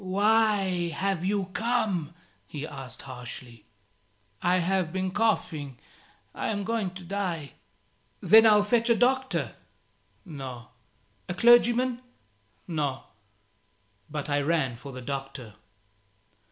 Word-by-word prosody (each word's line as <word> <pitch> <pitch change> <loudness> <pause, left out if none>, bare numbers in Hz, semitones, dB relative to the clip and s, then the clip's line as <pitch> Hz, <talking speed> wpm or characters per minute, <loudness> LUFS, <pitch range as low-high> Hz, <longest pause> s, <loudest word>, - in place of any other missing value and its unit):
"Why 200 -2 +2
have 195 -3 -1
you 195 -1 -1
come?" 215 -9 -1 0.3
he 145 +5 -6
asked, 135 -5 -9
harshly. 125 -3 -9 0.8
"I 180 +1 +3
have 185 -1 0
been 185 0 -2
coughing. 165 - -1 0.6
I - - -3
am 205 -2 -1
going 205 -4 -2
to 185 - -9
die." 175 -5 -3 0.7
"Then 220 +1 +7
I'll 210 -1 +6
fetch 230 +2 +1
a 235 - +5
doctor." 260 +3 +1 0.7
"No." 130 - -8 0.6
"A 180 - -2
clergyman?" 240 +3 +4 0.7
"No." 145 -6 -2 1.1
But 150 -1 -4
I 145 -1 +1
ran 140 -5 0
for 140 +4 -10
the 130 -1 -8
doctor. 135 -4 -6
180 Hz, 115 wpm, -27 LUFS, 140-215 Hz, 1.1 s, Then